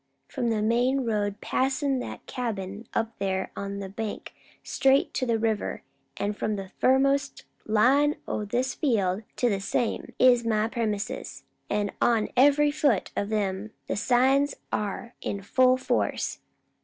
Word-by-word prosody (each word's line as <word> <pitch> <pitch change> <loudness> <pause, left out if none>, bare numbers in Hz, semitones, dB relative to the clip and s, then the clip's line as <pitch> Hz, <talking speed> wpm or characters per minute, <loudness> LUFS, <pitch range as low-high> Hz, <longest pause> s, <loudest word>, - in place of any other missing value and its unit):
From 240 - -1
the 215 -2 0
main 245 +4 +2
road 205 -2 -1
passin' 270 0 0
that - - -7
cabin 210 -4 -4
up 225 0 -2
there 190 -1 -1
on 200 0 -4
the 200 -1 -5
bank, 210 +2 -6 0.3
straight 270 +1 +2
to 255 - -1
the 230 -1 +2
river, 220 -2 -1 0.3
an' 205 +1 -1
from 210 +1 -2
the 195 -1 -7
furthermost 275 +1 +2 0.2
line 270 +8 +4
o' 215 - -2
this 245 +5 -1
field 205 -8 +1
to 245 - +1
the 200 -4 +1
same, 230 +3 -2
is 245 -2 +5
my 220 -1 +1
premises, 220 -3 -3 0.3
an' 205 -1 0
on 230 -3 +3
every 290 +3 +5
foot 285 -9 +1
of 200 +2 -2
'em 205 0 -2
the - - -2
signs 265 +5 +3 0.2
are 210 +4 -3
in 200 -1 -4
full 255 +4 +4
force. 255 - -1
225 Hz, 150 wpm, -27 LUFS, 205-260 Hz, 0.3 s, is